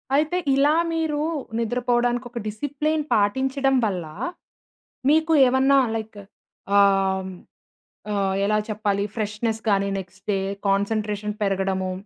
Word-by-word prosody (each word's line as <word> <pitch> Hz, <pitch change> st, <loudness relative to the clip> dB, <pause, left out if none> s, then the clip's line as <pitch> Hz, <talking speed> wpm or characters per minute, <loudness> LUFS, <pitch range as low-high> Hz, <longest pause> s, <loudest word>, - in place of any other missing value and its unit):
అయితే 310 Hz, +5 st, +1 dB, 0.2 s
ఇలా 285 Hz, +3 st, +4 dB, 0.2 s
మీరు 320 Hz, -2 st, -1 dB, 0.4 s
నిద్రపోవడానికి 245 Hz, +1 st, 0 dB
ఒక 240 Hz, -, -6 dB
డిసిప్లిన్ 290 Hz, +8 st, -2 dB
పాటించడం 265 Hz, +6 st, +1 dB
వల్ల, 185 Hz, -5 st, -2 dB, 1.0 s
మీకు 320 Hz, +2 st, +3 dB
ఏమన్నా 265 Hz, +2 st, +4 dB, 0.2 s
లైక్ 220 Hz, -1 st, -6 dB, 0.6 s
ఆహ్, 195 Hz, -1 st, +3 dB, 0.8 s
ఆహ్, 195 Hz, -1 st, 0 dB
ఎలా 215 Hz, +1 st, +2 dB
చెప్పాలి 205 Hz, -1 st, -1 dB
ఫ్రెష్నెస్ 220 Hz, +1 st, -2 dB
గాని, 200 Hz, -1 st, +2 dB
నెక్స్ట్ 190 Hz, +1 st, -12 dB
డే 195 Hz, -, 0 dB, 0.3 s
కాన్సంట్రేషన్ 210 Hz, +1 st, -1 dB
పెరగడము, 190 Hz, -1 st, -1 dB
215 Hz, 105 wpm, -23 LUFS, 200-265 Hz, 1.0 s, ఇలా